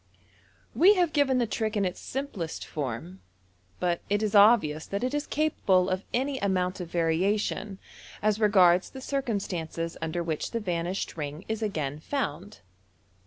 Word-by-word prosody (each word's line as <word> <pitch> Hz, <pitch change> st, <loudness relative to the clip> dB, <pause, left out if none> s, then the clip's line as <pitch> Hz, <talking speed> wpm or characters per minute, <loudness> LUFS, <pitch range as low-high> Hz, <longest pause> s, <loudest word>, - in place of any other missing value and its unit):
We 395 Hz, +5 st, +6 dB
have 350 Hz, -4 st, +1 dB
given 280 Hz, -3 st, +3 dB
the 245 Hz, -, +2 dB
trick 220 Hz, -1 st, -2 dB
in 200 Hz, -, +2 dB
its 180 Hz, -, -3 dB
simplest 240 Hz, -, -5 dB
form, 115 Hz, -, -5 dB, 0.6 s
but 175 Hz, -1 st, 0 dB
it 205 Hz, +1 st, +1 dB
is 215 Hz, -1 st, -1 dB
obvious 200 Hz, -8 st, +5 dB
that 200 Hz, +3 st, -3 dB
it 255 Hz, +2 st, -1 dB
is 295 Hz, 0 st, -2 dB
capable 195 Hz, -12 st, +2 dB
of 185 Hz, +1 st, -1 dB
any 265 Hz, +2 st, -1 dB
amount 185 Hz, -2 st, 0 dB
of 175 Hz, -2 st, -6 dB
variation 190 Hz, +4 st, 0 dB, 0.4 s
as 215 Hz, 0 st, +1 dB
regards 185 Hz, -4 st, +5 dB
the 265 Hz, -, -9 dB
circum 260 Hz, -6 st, -1 dB
stances 165 Hz, -2 st, -4 dB
under 165 Hz, +2 st, -2 dB
which 160 Hz, -2 st, -2 dB
the 230 Hz, -, -2 dB
vanished 180 Hz, -3 st, -3 dB
ring 150 Hz, +3 st, -5 dB
is 220 Hz, 0 st, -3 dB
again 150 Hz, -9 st, -2 dB
found. 180 Hz, -, -4 dB
195 Hz, 160 wpm, -28 LUFS, 165-225 Hz, 0.6 s, We